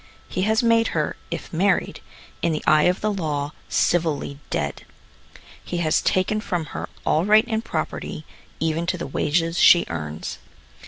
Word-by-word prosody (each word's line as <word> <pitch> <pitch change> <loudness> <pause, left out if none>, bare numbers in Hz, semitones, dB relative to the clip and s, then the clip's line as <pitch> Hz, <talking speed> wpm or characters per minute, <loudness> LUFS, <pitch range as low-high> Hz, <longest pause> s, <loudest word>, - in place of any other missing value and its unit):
He 185 - -3
has 220 +3 +2
made 230 -1 +4
her, - - 0
if - - -6
married, - - +1 0.4
in 170 - +1
the 155 - -3
eye 155 0 +5
of 180 +1 +2
the 215 0 0
law, 150 -6 -2 0.2
civilly 155 -4 0
dead. 70 -1 -2 0.8
He 175 - -4
has 160 -2 +2
taken 200 +3 +1
from 175 -6 -2
her - - -5 0.2
all 155 - +2
right 215 +3 +5
in 220 -2 -1
property, 155 -5 -4 0.3
even 165 +1 -1
to 180 - 0
the - - -4
wages 165 +4 0
she 175 - +7
earns. 75 -2 -5
170 Hz, 160 wpm, -23 LUFS, 155-195 Hz, 0.8 s, she